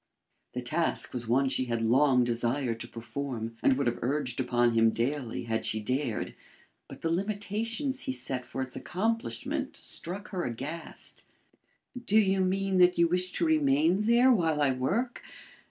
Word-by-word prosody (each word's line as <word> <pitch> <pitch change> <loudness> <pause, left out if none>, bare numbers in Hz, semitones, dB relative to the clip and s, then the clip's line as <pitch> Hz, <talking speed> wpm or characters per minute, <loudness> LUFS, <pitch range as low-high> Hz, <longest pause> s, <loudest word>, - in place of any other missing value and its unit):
The 125 - -3
task 155 +7 -1
was 120 -2 -3
one 135 +4 +3
she 130 -1 0
had 115 -2 -1
long 130 +2 +4
desired 120 0 -1
to 120 - -6
perform, 115 -1 -5
and 130 - +4
would 140 - 0
have 120 0 0
urged 130 -1 -1
upon 120 -2 +2
him 115 0 +5
daily 120 +2 -2
had 115 -1 -2
she 110 - 0
dared, 125 +1 -2 0.5
but - - -11
the 165 - 0
limitations 215 - -2
he 270 - -2
set 130 - -2
for 130 - -4
its 130 - -7
accomplishment 235 - -2
struck 195 +5 -2
her 180 -3 -3
aghast. 135 +8 -5 0.8
"Do 215 -2 +2
you 195 -3 +4
mean 190 0 +1
that 180 0 +5
you 170 - +5
wish 180 +2 0
to 170 - 0
remain 155 +4 +3
there 235 +4 +5
while 165 -9 +2
I 145 -2 +3
work? 195 - -1
145 Hz, 165 wpm, -29 LUFS, 120-195 Hz, 0.8 s, him